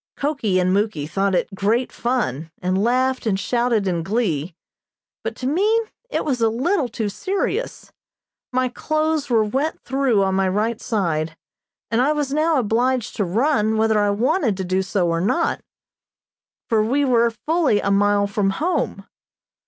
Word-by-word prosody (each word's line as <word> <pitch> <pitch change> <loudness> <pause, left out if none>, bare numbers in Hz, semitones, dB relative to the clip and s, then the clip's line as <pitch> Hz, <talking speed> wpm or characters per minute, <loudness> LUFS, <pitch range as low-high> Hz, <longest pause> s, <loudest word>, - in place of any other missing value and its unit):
Koki 275 -10 0
and 185 0 +2
Muky 200 -7 0
thought 195 +4 0
it 195 - -1
great 220 +6 0
fun, 170 - -2
and 185 +2 0
laughed 255 +1 +1
and 195 -3 +1
shouted 235 -3 0
in 175 -2 0
glee, 180 -5 -1 0.7
but - - -3
to 255 - -7
me 400 - +2 0.3
it - - -2
was 260 -5 -1
a 225 - +4
little 265 - 0
too 220 -1 -3
serious. 390 - -3 0.6
My 255 0 +1
clothes 310 +3 -1
were 225 -3 +3
wet 270 +9 -1
through 265 -7 +1
on 190 0 0
my 190 0 +2
right 215 +4 -1
side, 165 -8 -1 0.5
and 230 +2 +2
I 290 +4 +3
was 290 -2 -2
now 310 +1 +2
obliged 245 +1 0
to 210 - +1
run 220 - +1
whether 220 -1 +3
I 205 0 +2
wanted 235 - +1
to 190 - -2
do 185 +1 0
so 190 -1 0
or 165 0 0
not, 255 - 0 1.1
for 220 -2 +2
we 275 +6 +1
were 235 -2 +3 0.2
fully 315 -9 +2
a 200 - 0
mile 205 0 +3
from 200 -1 0
home. 350 +5 -1
225 Hz, 165 wpm, -21 LUFS, 195-265 Hz, 1.1 s, a